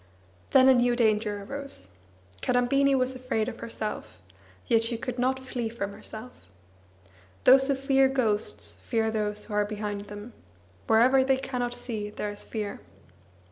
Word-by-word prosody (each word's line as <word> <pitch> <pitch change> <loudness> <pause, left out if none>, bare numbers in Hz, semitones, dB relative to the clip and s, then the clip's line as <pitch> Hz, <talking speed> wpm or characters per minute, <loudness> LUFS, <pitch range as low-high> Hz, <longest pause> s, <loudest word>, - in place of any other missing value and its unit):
Then 260 -1 +6
a 265 - +8
new 245 -1 +3
danger 215 -3 +1
arose. 275 - -4 0.5
Kadambini 270 +3 +3
was 255 0 +1
afraid 255 -4 -2
of 240 -2 -6
herself; 220 -2 -5 0.5
yet 230 0 +3
she 230 0 0
could 245 +1 -5
not 260 +1 +1
flee 245 -3 -3
from 200 -3 -4
herself. 220 +5 -9 1.1
Those 265 +1 +7
who 280 - +2
fear 270 0 +3
ghosts 225 -6 -2
fear 225 -2 0
those 210 -1 -2
who 215 - -8
are 210 0 +3
behind 205 -1 -4
them; 205 +3 -9 0.5
wherever 255 +4 +5
they 265 0 +2
cannot 245 -2 -3
see 225 -4 -4
there 210 0 -4
is 205 - -7
fear. 210 -3 -5
235 Hz, 150 wpm, -27 LUFS, 210-260 Hz, 1.1 s, a